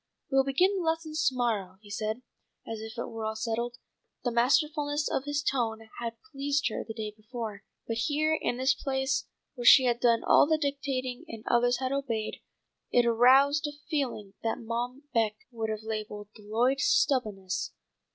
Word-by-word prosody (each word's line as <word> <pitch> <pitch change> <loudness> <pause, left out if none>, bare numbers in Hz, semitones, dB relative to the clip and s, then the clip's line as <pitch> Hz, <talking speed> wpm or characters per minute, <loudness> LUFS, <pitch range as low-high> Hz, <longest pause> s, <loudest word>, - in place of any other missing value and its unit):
"We'll 270 0 +5
begin 355 +9 +2
the - - -1
lessons 320 -1 0
to 265 - +2
morrow," 210 -7 -1
he 205 -1 -14
said, 215 +4 -3 0.4
as 225 -1 -4
if 220 +2 -8
it 235 - -2
were 225 -1 -6
all 220 0 -2
settled. 235 +2 -2 0.5
The 245 - 0
masterfulness 290 +4 +2
of 265 - -1
his 290 0 -1
tone 225 -5 -1
had 230 -1 -4
pleased 280 -1 0
her - - -4
the 220 0 -8
day 215 -2 -4
before, 215 -2 -6 0.2
but 230 - -3
here 300 +6 +1
in 245 -5 -1
the 260 +1 -3
place 265 0 0 0.3
where 245 -4 -7
she 260 +2 +9
had 240 -1 +2
done 235 -2 +3
all - - +6
the 315 0 +3
dictating 275 -2 -2
and 225 -7 -8
others 245 0 +3
had 260 +1 -2
obeyed, 240 -6 -2 0.5
it 245 -1 +4
aroused 270 +6 +5
a 290 0 -8
feeling 245 -9 -2
that 225 - -1
Mom 240 +4 -4
Beck 220 -3 +2 0.2
would 225 -2 -3
have 215 0 -3
labelled 215 -2 -5
"the 210 - -15
Lloyd 245 +5 +2
stubbo'ness." 205 - +1
245 Hz, 180 wpm, -29 LUFS, 220-275 Hz, 0.5 s, she